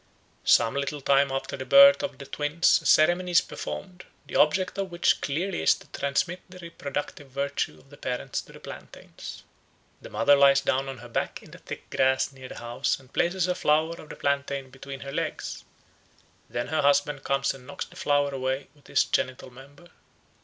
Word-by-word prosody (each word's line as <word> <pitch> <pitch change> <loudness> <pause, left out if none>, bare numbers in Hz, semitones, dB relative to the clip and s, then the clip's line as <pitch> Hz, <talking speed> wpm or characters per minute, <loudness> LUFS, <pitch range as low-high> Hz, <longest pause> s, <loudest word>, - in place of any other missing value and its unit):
Some 115 - +5
little 140 +1 -2
time 140 0 +3
after 135 0 -3
the 130 - -5
birth 280 - +8
of 285 - -4
the 140 - -9
twins 150 +4 +2
a - - -3
ceremony 175 +3 +4
is 175 - +5
performed, 185 -1 -7 0.2
the - - -9
object 185 +6 +2
of 195 -1 -2
which 175 0 +2
clearly 175 +7 -2
is - - +5
to - - -15
transmit 170 +6 -1
the 185 - -12
reproductive 145 -4 -6
virtue 140 +1 -2
of 135 - -22
the 145 - -13
parents 125 -1 -3
to - - -17
the - - -12
plantains. - - -10 0.6
The - - -10
mother 145 - +4
lies 140 0 +6
down 135 0 0
on 135 - -6
her 120 +1 -11
back 115 - -3
in - - -15
the - - -12
thick - - -9
grass 130 +1 +2
near 130 -1 -11
the - - -9
house 120 +1 -1
and 130 0 -20
places 175 +1 +1
a 180 - +1
flower 155 -1 +2
of 155 - -14
the - - -7
plantain 140 -1 -2
between 135 +1 -9
her 140 - -6
legs; - - -4 0.8
then 120 0 -3
her 155 0 +1
husband 145 0 +2
comes 135 0 +1
and 130 -2 -14
knocks - - -5
the 180 - -18
flower 145 -6 +1
away 130 0 -2
with 145 -2 -22
his - - +3
genital 130 0 -2
member. 140 +7 -15
140 Hz, 195 wpm, -26 LUFS, 135-170 Hz, 0.8 s, birth